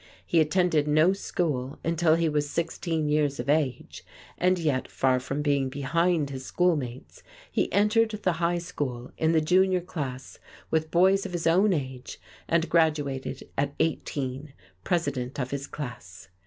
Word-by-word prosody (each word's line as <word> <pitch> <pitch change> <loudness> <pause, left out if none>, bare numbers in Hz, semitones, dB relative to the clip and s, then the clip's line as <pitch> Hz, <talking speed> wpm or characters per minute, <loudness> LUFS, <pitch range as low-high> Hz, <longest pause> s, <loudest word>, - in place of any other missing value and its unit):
He 170 - +2
attended 160 -1 +2
no 155 +5 +4
school 150 -8 -2
until 165 -1 +3
he 165 0 +1
was 150 -1 0
sixteen 165 -1 -2
years 150 -2 +1
of - - -4
age, 145 -4 -1 0.3
and 185 +1 +2
yet, 150 -6 0
far 130 -1 +1
from 135 +3 -3
being 140 -2 +1
behind 150 +2 0
his 130 -1 -6
schoolmates, 145 -8 -1 0.3
he - - 0
entered 210 +3 +3
the 210 -4 -1
high 170 +1 +2
school 130 -7 -5
in 160 +1 +1
the 160 - +4
junior 185 +3 +3
class 135 -7 -6 0.3
with 160 0 +1
boys 190 +3 +3
of 180 - -10
his 175 -1 -3
own 185 +5 +4
age 130 -6 -4 0.3
and 170 0 +2
graduated 145 -5 0
at 140 +1 -1
eighteen, 140 -3 -2 0.3
president 140 -7 -1
of 125 -1 -3
his 140 0 -4
class. 110 -10 -8
155 Hz, 155 wpm, -27 LUFS, 135-170 Hz, 0.3 s, no